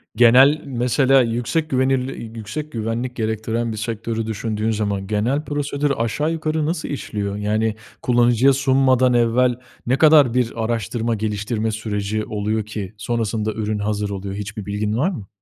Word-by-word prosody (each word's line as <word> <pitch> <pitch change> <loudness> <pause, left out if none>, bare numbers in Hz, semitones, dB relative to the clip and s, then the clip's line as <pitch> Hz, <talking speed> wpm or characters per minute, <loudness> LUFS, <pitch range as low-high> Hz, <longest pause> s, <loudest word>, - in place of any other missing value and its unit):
Genel 130 +6 +6
mesela 130 +1 +3
yüksek 125 +7 -1
güvenlir 130 -3 0 0.4
güvenlik 115 +2 -3
gerektiren 110 +1 -2
bir 110 - -5
sektörü 115 0 -3
düşündüğün 110 0 -2
zaman 100 -2 -2
genel 120 +9 0
prosedür 145 0 -1
aşağı 115 +7 0
yukarı 155 -1 -1
nasıl 160 +1 -2
işliyor? 105 -8 -3
Yani, 105 +1 0 0.3
kullanıcıya 120 +2 +4
sunmadan 130 -1 +3
evvel 120 +1 +3 0.3
ne 130 +2 +2
kadar 150 -5 +6
bir 125 -2 +1
araştırma 115 0 -1
geliştirme 110 +1 -2
süreci 105 -1 -2
oluyor 105 +1 -2
ki 105 -2 -6
sonrasında 110 -1 -2
ürün 105 -1 -2
hazır 105 0 -1
oluyor. 100 0 -5
Hiçbir 105 0 -6
bilgin 105 +1 -2
var 150 +9 +2
mı? 110 - -7
115 Hz, 140 wpm, -21 LUFS, 105-130 Hz, 0.4 s, Genel